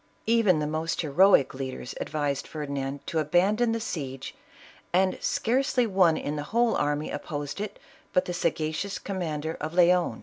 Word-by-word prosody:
Even 225 -6 +4
the 150 - -1
most 155 +2 -2
heroic 160 0 +4
lead 130 -1 -4
ers 125 - -7
advised 145 -2 -2
Ferdinand 140 -2 -4
to 160 - -1
abandon 195 +10 +2
the 230 - -1
siege, 135 - -5 0.6
and 185 +1 +3
scarce 260 +4 0
ly 250 - +5
one 185 -6 +3
in 145 - -3
the - - -2
whole 235 +1 +2
army 145 +1 -1
opposed 145 +3 -5
it 210 - -5 0.3
but 185 - +2
the 175 - -3
sagacious 170 +3 -1
commander 160 -5 -3
of 155 +3 -4
Leon. 175 -8 +3
165 Hz, 165 wpm, -27 LUFS, 145-195 Hz, 0.6 s, ly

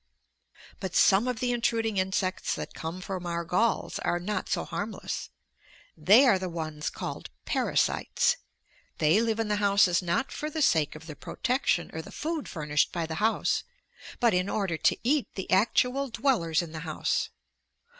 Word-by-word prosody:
But 190 -3 -5
some 200 +5 +5
of 250 -3 -2
the 250 -1 0
intruding 230 -3 0
insects 185 0 0
that - - -6
come 165 +3 -6
from 185 -2 -5
our 170 0 -2
galls 220 +8 0
are 175 - 0
not 185 +1 -3
so - - -1
harmless. 210 +2 -4 0.7
They 200 - +6
are 215 -7 +4
the 185 -1 -3
ones 155 -3 -4
called - - -6 0.2
parasites. - - +1 0.6
They 160 +8 +4
live 225 -1 0
in 225 - 0
the 210 0 0
houses 200 -3 +4
not 180 +9 -1
for 305 - -4
the 310 0 -1
sake 155 - +2
of 155 +1 -11
the 155 -2 -8
protection 245 - -1
or 160 - -4
the - - -12
food 315 -1 -3
furnished 150 -3 0
by 170 -2 -2
the 160 +4 -5
house, 220 +1 +2 0.6
but 235 -4 +4
in 180 +2 +1
order 195 -6 -1
to - - +2
eat 275 +3 +2
the 190 - -4
actual 250 +7 +2
dwellers 220 - +1
in 165 - -8
the 160 - -6
house. 155 -1 -1
190 Hz, 170 wpm, -28 LUFS, 170-230 Hz, 0.7 s, They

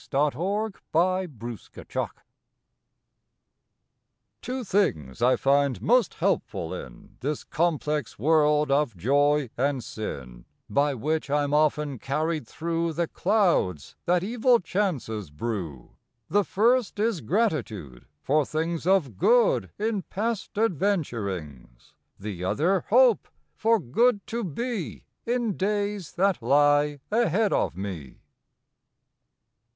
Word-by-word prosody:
June 145 +1 +2 0.4
Fifth - - -26
BLESSINGS 160 - -1 2.7
TWAIN 255 0 -4
things 80 - 0
I 125 +2 +5
find 140 -1 +2
most 245 +1 +2
helpful - - -1
in - - -10
This 145 +2 -3
complex 150 -3 -1
world 150 -1 +3
of 140 -7 +1
joy 145 - +2
and 135 -1 0
sin 65 - -7 0.2
By 140 0 +1
which 155 +5 -2
I 145 +1 +2
m 145 0 -2
often 150 -3 +1
carried 155 0 -2
through 165 +2 -2
The 170 +2 -1
clouds 175 - +1
that 175 0 +3
evil 240 +3 +3
chances 155 - -2
brew; 80 - -5 0.4
The 205 +3 +2
first 235 +3 +2
is 215 -4 0
GRATITUDE 115 - -2 0.2
for 150 +2 +3
things 165 +3 -3
Of 150 - +2
good 215 - +3
in 215 -1 -1
past 215 +3 -3
adventurings, 115 - -2 0.3
The 100 -3 -6
other 160 - +1
HOPE 245 -1 +5 0.3
for 225 +1 +2
good 205 - +2
to 235 +1 -3
be 210 - -4 0.2
In 235 -4 0
days 205 -2 -2
that 190 -5 +1
lie 145 +3 +3
ahead 215 -2 +2
of - - 0
me. 90 -10 -6
155 Hz, 110 wpm, -26 LUFS, 120-200 Hz, 2.7 s, I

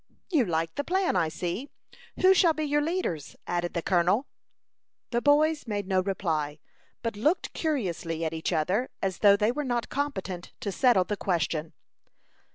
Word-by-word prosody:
"You 295 -9 +3
like 165 -2 -1
the 285 - -2
plan, 375 - +1
I 165 -3 +2
see. 175 - -4 0.5
Who 375 +1 +7
shall 345 -3 +4
be 310 - -2
your 295 0 +1
leaders?" 295 - -2
added 175 0 -2
the 170 - -1
colonel. 185 +7 +2 0.9
The 240 -1 +1
boys 295 0 +3
made 205 -3 -2
no 190 -1 +2
reply, 160 -6 -2 0.5
but 230 -2 -2
looked 300 - 0
curiously 175 - -2
at 160 - -2
each 160 +2 -2
other, 180 +10 0
as 190 -1 -1
though 200 -1 +6
they 210 +2 +2
were 295 +4 -3
not 240 -3 -1
competent, 195 -11 -3
to 200 - -2
settle 240 -3 +4
the 205 +3 -3
question. 165 -3 -1
200 Hz, 165 wpm, -28 LUFS, 170-285 Hz, 0.9 s, Who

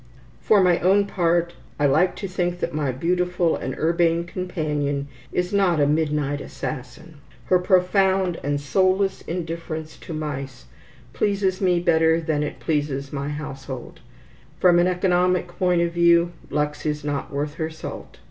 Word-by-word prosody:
For 205 -3 +4
my 175 -1 +4
own 195 +3 +4
part, 175 -3 +1 0.3
I 145 - +3
like 155 +7 +3
to 200 - -5
think 175 -1 -2
that - - -2
my 145 -3 0
beautiful 180 +4 0
and 130 +1 -5
urbane 170 +1 +2
companion 150 -6 -2 0.2
is 180 +2 -1
not 190 -5 +3
a 145 - +4
midnight 150 -1 0
assassin. 155 +4 -7 0.3
Her 185 - +3
profound 185 0 +2
and 145 +1 0
soulless 190 +6 +1
indifference 165 -2 -5
to - - -10
mice 140 -4 -5 0.5
pleases 195 -2 0
me 180 -2 +3
better 165 -1 +3
than 155 -2 -1
it 150 - -4
pleases 145 -3 -2
my 140 0 -3
household. 135 -4 -7 0.6
From 175 -1 +5
an 175 - +4
economic 180 0 +2
point 175 -1 +1
of 170 - -1
view, 170 0 +4 0.2
Lux 150 0 -2
is 150 -1 -2
not 145 -1 -3
worth 145 +1 -2
her 160 - -1
salt. 160 - -9
170 Hz, 150 wpm, -23 LUFS, 150-180 Hz, 0.6 s, From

